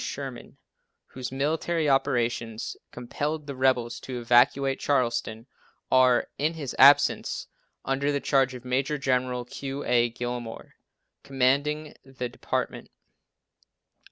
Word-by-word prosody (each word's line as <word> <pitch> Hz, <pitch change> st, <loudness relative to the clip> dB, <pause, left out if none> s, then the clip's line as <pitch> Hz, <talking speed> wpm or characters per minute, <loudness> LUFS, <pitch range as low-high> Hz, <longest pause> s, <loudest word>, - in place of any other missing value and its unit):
Sherman, -, -, -7 dB, 0.5 s
whose 130 Hz, -1 st, -6 dB
military 155 Hz, +4 st, -1 dB
operations 120 Hz, -4 st, 0 dB
compelled 145 Hz, +5 st, -4 dB
the 140 Hz, -1 st, -6 dB
rebels 130 Hz, -2 st, +1 dB
to 125 Hz, -2 st, -6 dB
evacuate 125 Hz, +3 st, +3 dB
Charleston, 120 Hz, -4 st, -1 dB, 0.5 s
or, 130 Hz, -1 st, +5 dB
in 155 Hz, +3 st, 0 dB
his 145 Hz, -5 st, -5 dB
absence, 140 Hz, +2 st, +5 dB, 0.4 s
under 135 Hz, +2 st, 0 dB
the 140 Hz, -, 0 dB
charge 135 Hz, -2 st, +1 dB
of 125 Hz, 0 st, -10 dB
Major 135 Hz, +4 st, 0 dB
General 125 Hz, -2 st, -1 dB
Q. 135 Hz, +3 st, -6 dB
A. 120 Hz, -1 st, +3 dB
Gillmore, 120 Hz, -1 st, -6 dB, 0.5 s
commanding 140 Hz, +3 st, 0 dB
the 130 Hz, -2 st, -6 dB
department. -, -, -4 dB
130 Hz, 110 wpm, -26 LUFS, 120-140 Hz, 0.5 s, or